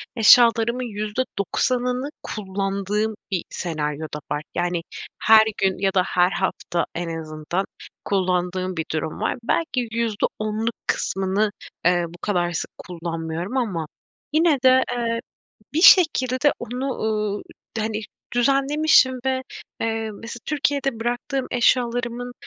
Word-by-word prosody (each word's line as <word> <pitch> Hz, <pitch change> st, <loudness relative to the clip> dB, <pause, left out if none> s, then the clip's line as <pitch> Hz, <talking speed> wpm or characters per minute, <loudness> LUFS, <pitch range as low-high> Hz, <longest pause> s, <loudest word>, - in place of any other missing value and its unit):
eşyalarımın 235 Hz, +1 st, +6 dB
%90'ını 245 Hz, +4 st, -1 dB
kullandığım 200 Hz, +1 st, -2 dB, 0.2 s
bir 185 Hz, -3 st, 0 dB
senaryo 155 Hz, -2 st, -3 dB
da 150 Hz, -, -3 dB
var. 150 Hz, 0 st, -1 dB
Yani, 175 Hz, -1 st, 0 dB, 0.4 s
her 220 Hz, 0 st, +8 dB
gün 190 Hz, -1 st, +1 dB
ya 195 Hz, 0 st, 0 dB
da 185 Hz, -2 st, +3 dB
her 180 Hz, 0 st, +2 dB
hafta 175 Hz, -2 st, -1 dB
en 165 Hz, -1 st, -3 dB
azından 155 Hz, +4 st, -3 dB, 0.4 s
kullandığım 185 Hz, -1 st, 0 dB
bir 160 Hz, -, -1 dB
durum 155 Hz, 0 st, -3 dB
var. -, -, 0 dB
Belki 255 Hz, -2 st, 0 dB
%10'luk 220 Hz, 0 st, -1 dB
kısmını, 195 Hz, +3 st, 0 dB, 0.3 s
eee, 175 Hz, -1 st, +3 dB
bu 170 Hz, +1 st, -13 dB
kadar 175 Hz, -4 st, 0 dB
sık 170 Hz, -, -3 dB
kullanmıyorum. 165 Hz, +4 st, -4 dB
Ama 185 Hz, -11 st, -1 dB, 0.5 s
yine 320 Hz, -1 st, +4 dB
de, 260 Hz, 0 st, +6 dB
eee, 230 Hz, -1 st, -1 dB, 0.6 s
bir 325 Hz, -, +2 dB
şekilde 290 Hz, -7 st, +6 dB
onu, 255 Hz, +4 st, -3 dB
ııı, 210 Hz, -2 st, -1 dB, 0.4 s
hani, 215 Hz, 0 st, -1 dB, 0.3 s
düzenlemişim 275 Hz, +1 st, +4 dB
ve, 260 Hz, 0 st, +1 dB, 0.4 s
eee, 225 Hz, -1 st, -1 dB
mesela 230 Hz, +3 st, -8 dB
Türkiye'de 280 Hz, -5 st, 0 dB
bıraktığım 245 Hz, +3 st, -2 dB
eşyalarımın 245 Hz, 0 st, +1 dB
215 Hz, 120 wpm, -23 LUFS, 180-245 Hz, 0.6 s, her